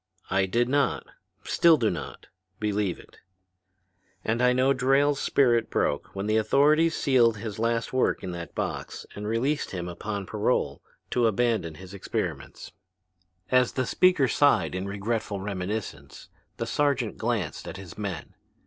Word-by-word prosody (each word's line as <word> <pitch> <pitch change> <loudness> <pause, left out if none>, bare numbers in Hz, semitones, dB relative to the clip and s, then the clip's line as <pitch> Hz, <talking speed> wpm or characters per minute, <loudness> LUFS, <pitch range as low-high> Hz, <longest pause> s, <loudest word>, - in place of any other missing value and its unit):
"I 95 0 +2
did 120 +5 +1
not, 140 +2 +1 0.4
still 165 -2 +4
do 115 -6 +1
not, 85 - -7 0.3
believe 105 -3 -1
it. - - -17 1.1
And 115 +2 0
I 125 0 +5
know 130 +2 +3
Drayle's 135 +2 +2
spirit 120 -4 +2
broke 70 - -1
when 100 +1 -3
the 110 +1 +2
authorities 150 +9 +3
sealed 120 -5 +3
his 105 0 -6
last 115 +1 0
work 130 - +1
in 90 - -4
that 85 -3 -7
box - - -4
and 105 0 -5
released 130 +7 0
him 90 -2 -5
upon 100 +3 -5
parole 105 - -1 0.3
to 120 -2 +3
abandon 110 -7 0
his 95 +3 -11
experiments." 100 - -5 0.8
As 125 -1 +3
the 130 - 0
speaker 180 -2 +3
sighed 145 +3 +3
in 95 +1 -3
regretful 100 +1 -2
reminiscence, 100 +2 -5 0.3
the - - -2
sergeant 140 -6 0
glanced 110 -8 -2
at - - -6
his 95 -3 -10
men. 95 -7 -5
110 Hz, 150 wpm, -26 LUFS, 100-130 Hz, 1.1 s, I